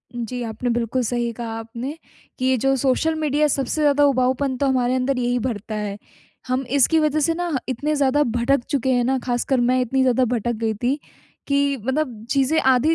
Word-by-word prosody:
जी, 240 +1 -4
आपने 230 +2 -3
बिल्कुल 235 +2 0
सही 240 0 -1
कहा 225 -1 -5
आपने। 240 +7 -6 0.4
कि 255 - -1
ये 260 -1 +3
जो 270 +3 +2
सोशल 270 +5 +1
मीडिया 300 -1 +1
सबसे 280 +2 -1
ज़्यादा 290 -1 +4
उबाऊपन 260 0 +1
तो 280 - 0
हमारे 255 -1 +1
अंदर 260 +1 0
यही 245 0 0
भरता 220 -3 -4
है। 210 -1 -3 0.5
हम 255 +1 -1
इसकी 320 +4 +4
वजह 305 0 +1
से 330 +3 +2
ना 350 0 -3 0.2
इतने 295 +5 -1
ज़्यादा 285 +1 +3
भटक 240 +2 +1
चुके 265 -3 0
हैं 245 - +2
ना, 265 +2 +1
ख़ासकर 245 +1 0
मैं 250 +1 +2
इतनी 265 +2 0
ज़्यादा 255 0 +3
भटक 240 -1 -1
गई 220 -1 +1
थी, 250 +7 -1 0.5
कि 280 0 +1
मतलब 260 -5 -2
चीज़ें 275 +4 +2
आधी 260 +3 +3
255 Hz, 195 wpm, -22 LUFS, 240-280 Hz, 0.5 s, ज़्यादा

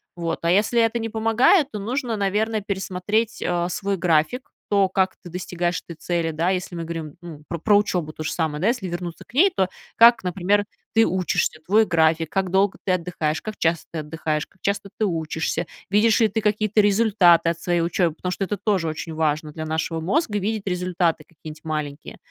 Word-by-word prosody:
Вот, 170 -1 -3
а 170 - +3
если 210 +5 +3
это 230 +1 +1
не 225 0 -3
помогает, 225 - +3
то 210 - -5
нужно, 240 +3 -2
наверное, 210 +2 0
пересмотреть, 200 +3 -2
э, 175 -1 0
свой 195 +2 -2
график, 170 - +1 0.2
то, 200 -2 +4
как 190 0 +1
ты 175 - -9
достигаешь 175 0 -2
этой 170 - -8
цели. 170 0 -1
Да, 165 +3 0
если 180 -1 -3
мы 170 - -4
говорим, 160 -3 -6
ну, 165 -4 -10
про 170 - -3
про 205 +6 +3
учебу 180 -6 -1
то - - -9
же - - -2
самое, 155 -3 -2
да, 195 - +2
если 235 -5 0
вернуться 175 -1 -5
к - - -22
ней, 370 +9 +5
то 190 -1 +1 0.3
как, 235 -1 +7
например, 190 +3 +1 0.3
ты 225 0 +5
учишься, 180 -3 0
твой 215 +4 +4
график, 160 -1 +2
как 190 -2 -1
долго 195 +1 +2
ты 190 - +1
отдыхаешь, 165 -3 -1
как 215 -1 -6
часто 165 0 0
ты 165 - -4
отдыхаешь, 155 0 -2
как 190 - -32
часто 200 0 -2
ты 215 - +2
учишься, 160 -1 -2 0.2
видишь 210 +2 +4
ли 225 - +6
ты 215 +2 -2
какие-то 215 0 +2
результаты 195 -5 +4
от 165 0 -3
своей 175 -1 0
учебы, 170 0 +1
потому 180 +2 -4
что 195 - -2
это 205 +2 -2
тоже 195 -4 0
очень 160 +1 -5
важно 155 -1 0
для 155 +1 -6
нашего 160 +1 -2
мозга- 210 - 0
видеть 210 +1 -3
результаты 180 -3 0
какие-нибудь 155 -1 -12
маленькие. 150 -2 -5
180 Hz, 200 wpm, -23 LUFS, 165-210 Hz, 0.3 s, как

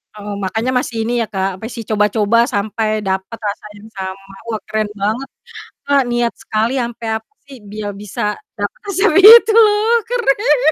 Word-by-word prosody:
Oh, 205 0 -7
makanya 220 +7 -1
masih 235 - -5
ini 240 - -1
ya - - -3
Kak, 190 0 0
masih 230 +1 -6
coba-coba 210 +1 +1 0.2
sampai 215 +2 -1 0.2
dapet 190 +4 -3
rasa 205 +1 -5
yang 210 +2 -14
sama, 195 +1 -7
wah, 220 -2 -3
keren 215 -1 -2
banget. 220 +7 -1 0.6
Kak 280 -1 +3
niat 240 -1 0
sekali 220 +2 -1
sampe, 235 -1 -5
apa 220 - -18
sih, 275 -1 -12
biar 210 -1 -5
bisa 210 +3 -6 0.3
dapet 205 0 -4
resep 400 +1 +2
itu, 440 +2 +9 0.6
keren. 445 - +1
220 Hz, 155 wpm, -17 LUFS, 205-250 Hz, 0.6 s, itu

